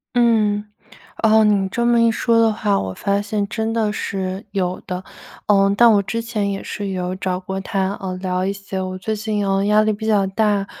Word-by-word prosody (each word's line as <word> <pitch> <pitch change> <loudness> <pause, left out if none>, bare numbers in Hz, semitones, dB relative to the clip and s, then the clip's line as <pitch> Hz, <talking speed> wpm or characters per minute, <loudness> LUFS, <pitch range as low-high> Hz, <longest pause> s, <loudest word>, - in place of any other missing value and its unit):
嗯。 215 -4 +2 0.6
呃， 220 0 +5
你 200 -2 +2
这 235 +5 -1
么 235 0 +4
一 230 0 +4
说 230 +1 +1
的 225 -1 +4
话， 210 -2 0
我 95 -1 -4
发 200 - -1
现 205 0 -2
真 220 +1 -2
的 220 -2 +1
是， 190 -1 -4
有 185 -2 -2
的。 180 0 -4 0.4
呃， 195 -1 +4
但 235 +1 +7
我 205 - +4
之 230 +4 -3
前 220 -3 -2
也 195 - -4
是 205 -1 -5
有 185 -1 -3
找 185 -1 -2
过 190 +1 -5
他， 195 -1 -1
呃， 190 -1 -3
聊 185 0 -2
一 195 - 0
些， 195 -1 -5
我 185 0 -4
最 215 +4 -3
近 215 0 -2 0.3
压 210 +1 +5
力 215 - +2
比 215 +1 -6
较 205 -3 +3
大， 205 0 +1
205 Hz, 220 characters per minute, -20 LUFS, 190-220 Hz, 0.6 s, 但